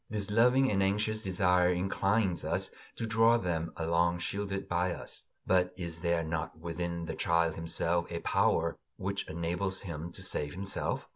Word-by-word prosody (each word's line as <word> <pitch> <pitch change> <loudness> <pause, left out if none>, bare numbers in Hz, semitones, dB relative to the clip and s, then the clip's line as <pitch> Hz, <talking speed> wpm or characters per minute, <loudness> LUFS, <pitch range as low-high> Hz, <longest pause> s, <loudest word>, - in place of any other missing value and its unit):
This 105 -1 -3
loving 125 +4 +4
and 100 -1 +2
anxious 105 +3 +1
desire 90 -2 +3
inclines 95 +1 +1
us - - -1 0.2
to 115 - -3
draw 115 +1 +4
them 85 -5 -2
along 85 +1 +2
shielded 100 +2 -3
by 90 0 0
us. - - -8 0.2
But 90 -1 +2
is 85 -3 -5
there 85 -1 +1
not 80 0 -3
within 85 +1 -4
the - - -4
child 85 -1 +2
himself 85 +1 -1
a 85 - -2
power - - +2 0.2
which 100 +1 -3
enables 90 +4 -2
him 85 -2 -6
to 95 - -8
save 75 -5 -1
himself? 95 +1 -1
90 Hz, 160 wpm, -31 LUFS, 85-100 Hz, 0.2 s, loving